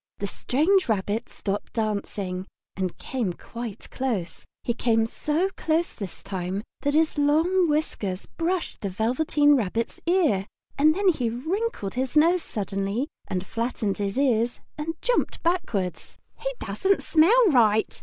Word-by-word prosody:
The 200 Hz, -, -3 dB
strange 310 Hz, -, +2 dB
rabbit 205 Hz, +1 st, 0 dB
stopped 200 Hz, 0 st, -4 dB
dancing, 200 Hz, -4 st, -2 dB, 0.3 s
and 185 Hz, -2 st, -2 dB
came 235 Hz, -9 st, -2 dB
quite 230 Hz, +2 st, -8 dB
close. 230 Hz, -10 st, -2 dB, 0.2 s
He 235 Hz, -, 0 dB
came 225 Hz, -2 st, +2 dB
so 310 Hz, +10 st, -1 dB
close 325 Hz, +2 st, 0 dB
this 195 Hz, -5 st, -8 dB
time 190 Hz, +1 st, -3 dB, 0.2 s
that 285 Hz, +1 st, +1 dB
his 315 Hz, -1 st, +2 dB
long 325 Hz, +5 st, +3 dB
whiskers 210 Hz, -11 st, -1 dB
brushed 345 Hz, +1 st, -2 dB
the 200 Hz, -, -2 dB
Velveteen 260 Hz, +8 st, +3 dB
Rabbit's 225 Hz, -1 st, -1 dB
ear, 305 Hz, -, +3 dB, 0.3 s
and 310 Hz, +2 st, +4 dB
then 395 Hz, 0 st, +3 dB
he 255 Hz, -9 st, +1 dB
wrinkled 315 Hz, -, -2 dB
his 260 Hz, +3 st, -1 dB
nose 340 Hz, +4 st, +5 dB
suddenly 200 Hz, -, -2 dB, 0.2 s
and 185 Hz, -1 st, -2 dB
flattened 225 Hz, -3 st, -2 dB
his 200 Hz, +2 st, -2 dB
ears 240 Hz, -4 st, +2 dB, 0.2 s
and 315 Hz, +2 st, -4 dB
jumped -, -, 0 dB
backwards. 200 Hz, -, -1 dB, 0.2 s
"He -, -, -3 dB
doesn't 390 Hz, 0 st, 0 dB
smell 405 Hz, +10 st, +5 dB
right!" 220 Hz, -6 st, +3 dB
245 Hz, 140 wpm, -25 LUFS, 200-320 Hz, 0.3 s, nose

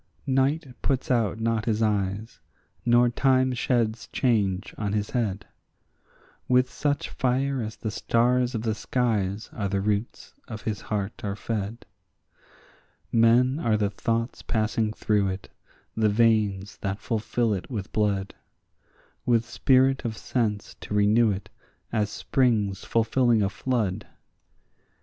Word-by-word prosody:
Night 140 Hz, +4 st, +1 dB, 0.2 s
puts 135 Hz, -2 st, 0 dB
out 115 Hz, -3 st, +1 dB
not 115 Hz, -1 st, 0 dB
his 110 Hz, -1 st, +1 dB
eyes, 105 Hz, 0 st, -1 dB, 0.4 s
nor 120 Hz, 0 st, +4 dB
time 130 Hz, +1 st, +2 dB
sheds 115 Hz, -3 st, 0 dB
change 100 Hz, -7 st, 0 dB
on 105 Hz, -2 st, -2 dB
his 105 Hz, -1 st, -1 dB
head; 105 Hz, -6 st, -1 dB, 1.0 s
With 125 Hz, 0 st, +3 dB
such 145 Hz, -1 st, -1 dB
fire 130 Hz, +1 st, 0 dB
as 110 Hz, -1 st, -5 dB
the 110 Hz, -, -4 dB
stars 125 Hz, +3 st, +1 dB
of 110 Hz, -, -2 dB
the 110 Hz, -2 st, 0 dB
skies 110 Hz, -3 st, -1 dB
are 100 Hz, -4 st, -2 dB
the 100 Hz, 0 st, 0 dB
roots 105 Hz, +3 st, -2 dB
of 110 Hz, -3 st, -7 dB
his 105 Hz, -3 st, -3 dB
heart 105 Hz, -1 st, -4 dB
are 100 Hz, -1 st, -2 dB
fed. 110 Hz, +1 st, -4 dB, 1.3 s
Men 120 Hz, +4 st, +4 dB
are 110 Hz, -7 st, +2 dB
the 105 Hz, -1 st, 0 dB
thoughts 115 Hz, +2 st, -2 dB
passing 110 Hz, 0 st, 0 dB
through 105 Hz, -2 st, +1 dB
it, 95 Hz, 0 st, -5 dB, 0.5 s
the 110 Hz, -1 st, +3 dB
veins 105 Hz, -3 st, +2 dB
that 100 Hz, 0 st, -3 dB
fulfil 115 Hz, 0 st, 0 dB
it 95 Hz, -, -5 dB
with 105 Hz, -7 st, -5 dB
blood, 100 Hz, -2 st, 0 dB, 0.9 s
With 115 Hz, -2 st, +3 dB
spirit 130 Hz, +2 st, +3 dB
of 110 Hz, -2 st, -3 dB
sense 110 Hz, -5 st, -2 dB
to 105 Hz, -, -4 dB
renew 105 Hz, +3 st, +4 dB
it 100 Hz, -1 st, -4 dB, 0.4 s
as 105 Hz, -2 st, 0 dB
springs 105 Hz, -5 st, 0 dB
fulfilling 115 Hz, -1 st, +2 dB
a 100 Hz, -, 0 dB
flood. 110 Hz, -6 st, -1 dB
110 Hz, 135 wpm, -26 LUFS, 105-120 Hz, 1.3 s, nor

